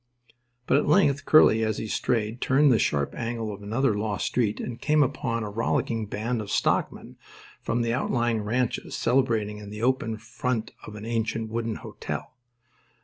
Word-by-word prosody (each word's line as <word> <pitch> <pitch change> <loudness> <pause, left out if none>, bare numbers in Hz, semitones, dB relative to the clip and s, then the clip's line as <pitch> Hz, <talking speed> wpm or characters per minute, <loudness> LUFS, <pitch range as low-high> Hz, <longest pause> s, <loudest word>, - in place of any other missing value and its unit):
But - - +3
at - - +1
length 145 -4 +3
Curly, 115 -7 +6
as 110 -1 0
he - - -4
strayed, 110 +1 -1
turned 140 +2 +4
the 115 - +4
sharp 70 -1 0
angle 115 -2 -3
of 100 - -10
another 115 +4 +1
lost 105 -1 -2
street 110 -4 0
and 120 -1 -6
came 150 -1 +4
upon 120 -3 -2
a 105 - -4
rollicking 115 0 -1
band 110 +3 -2
of 105 - -7
stockmen - - -1 0.4
from 120 +1 -1
the 115 0 0
outlying 120 -3 0
ranches 115 +3 -1
celebrating 115 -4 +1
in 105 -1 -9
the 105 +2 -6
open 130 -3 +1
in - - -6
front 115 +1 -3 0.2
of 105 - -9
an 105 0 -8
ancient 115 -1 -2
wooden 115 -1 -2
hotel. - - -6
115 Hz, 175 wpm, -26 LUFS, 110-125 Hz, 0.4 s, Curly